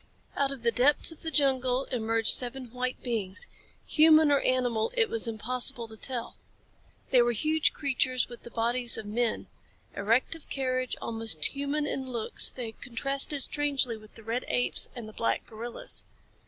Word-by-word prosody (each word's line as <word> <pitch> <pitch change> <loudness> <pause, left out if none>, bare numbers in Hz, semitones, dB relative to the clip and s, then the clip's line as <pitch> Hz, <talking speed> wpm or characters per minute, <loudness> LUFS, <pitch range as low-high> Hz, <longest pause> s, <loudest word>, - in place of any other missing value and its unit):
Out 280 -1 0
of 270 -4 -8
the 235 - +2
depths 275 +7 +4
of 325 - -11
the 325 - -2
jungle 265 -3 +1
emerged 225 -2 +2
seven 250 -1 -3
white 250 +1 -3
beings 220 - -3 0.4
human 310 -1 +5
or 285 - +4
animal 245 -4 0
it 450 -3 +2
was 460 - 0
impossible 235 +1 0
to 220 - -12
tell. 240 +1 -5 0.7
They 250 - +6
were 240 0 +2
huge 310 +7 +1
creatures 260 -2 0
with 240 - -12
the - - -11
bodies 235 +1 +1
of - - -6
men. 225 +2 -1 0.5
Erect 230 +9 +1
of 325 -2 -13
carriage, 255 -2 -2
almost 225 -9 -2
human 285 +2 -1
in 265 -2 -4
looks, 230 -3 +3
they 240 -3 -5
contrasted 275 +4 +1
strangely 280 -5 -1
with 215 -1 -16
the 225 - -12
red 230 +3 -2
apes 125 0 +2
and 235 -3 -8
the 215 - -11
black 230 - -1
gorillas. 235 - +1
250 Hz, 170 wpm, -28 LUFS, 230-275 Hz, 0.7 s, They